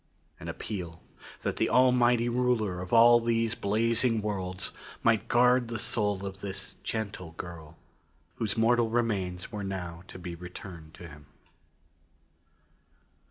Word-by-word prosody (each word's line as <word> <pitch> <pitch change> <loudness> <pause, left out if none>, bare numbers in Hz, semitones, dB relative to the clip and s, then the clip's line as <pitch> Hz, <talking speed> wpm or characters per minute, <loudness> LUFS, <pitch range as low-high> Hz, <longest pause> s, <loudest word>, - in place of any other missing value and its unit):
An - - -8
appeal: 85 -5 -5 0.4
That - - -2
the - - +2
Almighty 125 -2 +4
Ruler 120 -7 +1
of 90 - -7
all 120 +1 +8
these 115 -1 +1
blazing 115 +1 +1
worlds 95 -3 -3 0.3
might 110 -2 +3
guard 125 0 +4
the 115 -1 -4
soul 105 -3 -1
of 95 0 -7
this 95 -1 -5
gentle 100 -6 -4
girl 80 -2 -9 0.6
whose 110 -2 -2
mortal 115 0 +3
remains 100 -6 -1
were 105 -2 -4
now 90 -3 -5
to - - -10
be 90 -1 -6
returned 85 -2 -10
to 85 - -10
Him. 75 -2 -14
105 Hz, 130 wpm, -29 LUFS, 90-115 Hz, 0.6 s, all